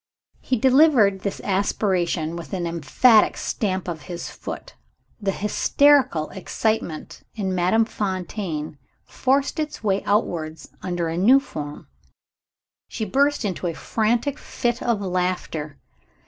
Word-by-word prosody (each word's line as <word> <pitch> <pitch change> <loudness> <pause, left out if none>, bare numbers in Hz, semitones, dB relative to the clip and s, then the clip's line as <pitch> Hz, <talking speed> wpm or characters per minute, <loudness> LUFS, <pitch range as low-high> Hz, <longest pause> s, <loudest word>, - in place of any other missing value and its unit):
He 255 - -1
delivered 255 -6 +5
this 200 0 -4
aspiration 185 -4 0
with 170 +2 -8
an 180 -2 -1
emphatic 170 - +4
stamp 190 -4 -2
of 165 -3 -4
his 175 -1 -5
foot. - - -8 0.5
The 200 - 0
hysterical 255 - +3
excitement 195 -3 -3
in 195 -4 -2
Madame 185 +5 +3
Fontaine 185 -7 -4 0.3
forced 275 +3 0
its 305 -6 -4
way 195 -2 +1
outwards 165 -6 -1
under 175 -2 -2
a 165 +1 -3
new 240 +9 +6
form. 150 - -7 1.0
She 220 - -4
burst 280 +4 +1
into 185 -2 -2
a 165 - -3
frantic 235 - 0
fit 240 0 -2
of 230 -4 0
laughter. 180 -5 -2
195 Hz, 120 wpm, -23 LUFS, 175-235 Hz, 1.0 s, new